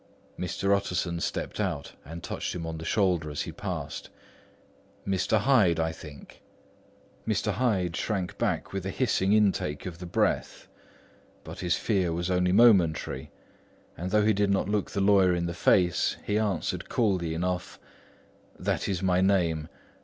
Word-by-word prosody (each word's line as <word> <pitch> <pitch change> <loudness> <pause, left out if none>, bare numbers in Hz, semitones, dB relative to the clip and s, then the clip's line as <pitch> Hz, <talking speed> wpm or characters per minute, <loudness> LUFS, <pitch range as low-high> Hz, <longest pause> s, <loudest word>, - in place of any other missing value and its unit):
Mr. 100 +2 0
Utterson 90 -3 -2
stepped - - -3
out 85 -9 -2
and 80 +4 -9
touched - - -4
him 85 -2 -4
on 80 -1 -5
the 80 - -7
shoulder 90 -6 +1
as 75 - -3
he - - -6
passed. - - -5 1.0
"Mr. 95 +3 +1
Hyde, 105 -10 +4
I 80 0 +1
think?" 75 -3 -12 0.9
Mr. - - 0
Hyde 95 -9 0
shrank 95 -3 -3
back - - -1
with 95 -2 -3
a - - -2
hissing 100 -4 +1
intake 100 -8 +1
of 85 -3 -6
the 90 - -7
breath. - - -1 0.8
But - - -9
his 90 -1 +1
fear 95 -6 0
was 85 +2 -2
only 90 0 +2
momentary; 90 - +3 0.7
and 90 +2 -4
though 105 +1 +3
he 110 - +4
did 100 0 +1
not 100 -1 +1
look 105 -1 -1
the 100 - -2
lawyer 95 -2 +4
in 85 0 -1
the 85 - -3
face, 90 +1 +2
he 105 +1 +1
answered 105 -3 -2
coolly 90 -8 0
enough: 90 +1 -3 0.8
"That - - -1
is 95 -2 -2
my 90 -1 +3
name. 85 -5 +2
90 Hz, 160 wpm, -28 LUFS, 85-100 Hz, 1.0 s, Hyde